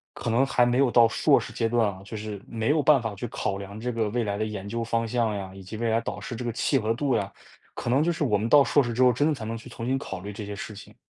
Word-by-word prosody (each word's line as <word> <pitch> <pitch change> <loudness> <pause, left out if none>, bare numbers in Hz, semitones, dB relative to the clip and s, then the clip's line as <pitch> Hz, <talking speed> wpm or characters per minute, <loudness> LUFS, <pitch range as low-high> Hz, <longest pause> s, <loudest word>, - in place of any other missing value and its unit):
可 - - -6
能 125 +4 +4
还 125 -2 +3
没 125 +2 +1
有 135 -3 +4
到 120 -1 +6
硕 - - +3
士 - - -8
阶 115 - 0
段 115 -2 +2
啊， 95 -1 -5
就 110 +2 -7
是 105 -2 -6
没 115 +2 -2
有 150 0 +3
办 145 -2 +5
法 115 -3 -4
去 110 +5 -5
考 100 -2 -2
量 100 +2 -8
这 125 +2 -2
个 110 -2 -1
未 120 +2 -1
来 100 0 -2
的 - - +1
研 100 -2 -5
究 115 +2 -3
方 115 0 -1
向 115 -2 0
呀， 95 -1 -5
以 95 - -11
及 105 +4 -8
未 115 0 -1
来 115 +1 +2
导 - - -5
师 120 - -6
这 125 - -5
个 120 - -2
契 135 +4 +1
合 110 +1 0
度 135 0 0
呀， 100 0 -1 0.4
可 120 - -3
能 135 +3 +4
就 170 - +2
是 155 - -2
我 105 -7 +2
们 115 +2 -2
到 145 -1 +7
硕 145 - +3
士 120 -2 -2
之 125 +3 +2
后 125 -1 +6
真 145 +6 +2
的 155 - +1
才 110 -4 -7
能 115 +1 -3
去 115 +2 -10
重 115 -1 -7
新 135 +1 0
考 95 -8 -6
虑 100 +1 -7
这 105 0 -7
些 100 - -5
事 110 0 -7
情。 100 - -13
115 Hz, 355 characters per minute, -26 LUFS, 105-125 Hz, 0.4 s, 到